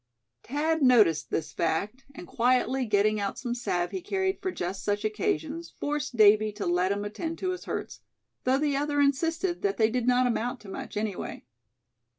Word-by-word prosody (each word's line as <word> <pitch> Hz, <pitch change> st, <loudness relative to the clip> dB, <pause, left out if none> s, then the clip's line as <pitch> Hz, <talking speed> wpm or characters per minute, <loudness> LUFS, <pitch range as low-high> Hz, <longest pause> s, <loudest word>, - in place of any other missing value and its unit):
Thad 310 Hz, +4 st, -1 dB
noticed 220 Hz, -, +4 dB
this 160 Hz, -, -2 dB
fact, 200 Hz, +10 st, -2 dB
and 180 Hz, -, -8 dB
quietly 250 Hz, +3 st, +1 dB
getting 210 Hz, 0 st, +2 dB
out 200 Hz, -1 st, -2 dB
some 240 Hz, -2 st, -3 dB
salve 180 Hz, -8 st, -1 dB
he 375 Hz, -, -4 dB
carried 380 Hz, 0 st, -1 dB
for 375 Hz, -, -1 dB
just 190 Hz, -, -4 dB
such 205 Hz, +1 st, -1 dB
occasions 215 Hz, -, -2 dB
forced 295 Hz, -2 st, -2 dB
Davy 215 Hz, 0 st, +6 dB
to 210 Hz, -, -5 dB
let 180 Hz, +2 st, +1 dB
him 205 Hz, +1 st, -2 dB
attend 325 Hz, +11 st, -4 dB
to 370 Hz, -, -1 dB
his 365 Hz, -, -6 dB
hurts, -, -, -5 dB, 0.4 s
though 260 Hz, +1 st, +3 dB
the 290 Hz, -1 st, 0 dB
other 290 Hz, +1 st, 0 dB
insisted 325 Hz, +6 st, +1 dB
that 400 Hz, -1 st, 0 dB
they 220 Hz, -1 st, +3 dB
"did 250 Hz, 0 st, -1 dB
not 250 Hz, 0 st, +4 dB
amount 245 Hz, +1 st, -1 dB
to 205 Hz, -, -12 dB
much, 195 Hz, -, -6 dB
anyway." 210 Hz, -3 st, -4 dB
245 Hz, 180 wpm, -28 LUFS, 205-295 Hz, 0.4 s, Davy